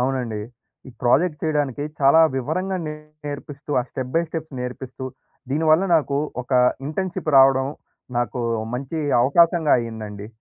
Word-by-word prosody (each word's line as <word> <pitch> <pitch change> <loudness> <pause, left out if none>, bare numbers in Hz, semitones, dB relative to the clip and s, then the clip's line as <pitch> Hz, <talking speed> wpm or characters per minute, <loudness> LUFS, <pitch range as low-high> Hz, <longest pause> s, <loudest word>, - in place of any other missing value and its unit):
అవునండి. 125 -4 -1 0.5
ఈ - - -9
ప్రాజెక్ట్ 150 +6 +2
చేయడానికి 145 -3 0 0.2
చాలా 140 +4 +6 0.2
వివరంగా 185 +9 -1
నేర్పిస్తూ, 150 -1 -8
ఆ - - -1
స్టెప్ 130 -1 -5
బై 170 - +4
స్టెప్ 160 -1 -5
నేర్పిస్తూ. 130 +1 -6 0.5
దీనివల్ల 155 +4 +3
నాకు 140 -3 0 0.2
ఒక 125 - -8 0.4
ఇంటర్న్‌షిప్ 175 -1 -2
రావడం 135 0 +5 0.5
నాకు 120 +1 -2 0.3
మంచి 140 +5 -4 0.2
అవకాశంగా 165 +2 +4
అయిందండి. 110 -3 -6
140 Hz, 120 wpm, -22 LUFS, 130-155 Hz, 0.5 s, చాలా